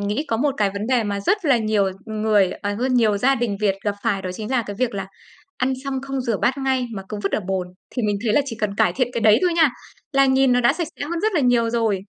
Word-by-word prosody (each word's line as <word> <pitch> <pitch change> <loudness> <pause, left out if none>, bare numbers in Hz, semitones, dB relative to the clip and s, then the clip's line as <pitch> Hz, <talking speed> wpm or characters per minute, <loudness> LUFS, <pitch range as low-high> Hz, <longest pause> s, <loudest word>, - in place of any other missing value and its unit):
nghĩ 205 +9 -1
có 225 - +1
một 275 +3 0
cái 200 -2 +1
vấn 200 +2 -4
đề 250 -2 +2
mà 200 -1 -2
rất 405 - 0
là 275 -5 +4
nhiều 215 -3 +1 0.2
người 215 -3 +2
ờ, 205 0 -1
hơn 255 +3 0
nhiều 220 -4 +3
gia 270 +6 +3
đình 230 -5 -1
Việt 200 -2 +2
gặp 205 -1 0
phải 195 -1 0
đó 185 - -4
chính 215 +3 -6
là 255 -3 +2
cái 205 -1 -6
việc 250 -4 0
là 195 -1 -4 0.5
ăn 260 +1 0
xong 270 -1 -3
không 270 -1 -3
rửa 230 -5 -1
bát 260 +3 +1
ngay 265 -2 0
mà 195 -2 -6
cứ 210 - -4
vứt 195 - 0
ở - - +1
bồn. 190 -2 -1 0.2
Thì 245 - -3
mình 205 -1 0
thấy 215 - +1
là 290 - +4
chỉ 230 -5 -5
cần 205 -2 -1
cải - - +2
thiện 255 -2 +1
cái 235 - -2
đấy 220 +1 +5
thôi 355 -2 +2
nha 320 -4 +5 0.4
là 275 0 +4
nhìn 265 -1 +3
nó 245 - +2
đã 240 - +4
sạch 340 -4 -3
sẽ 285 - -2
hơn 335 +2 -3
rất 435 0 +1
là 340 - +2
nhiều 240 -2 +3
rồi. 225 -4 0
230 Hz, 290 wpm, -22 LUFS, 205-265 Hz, 0.5 s, đấy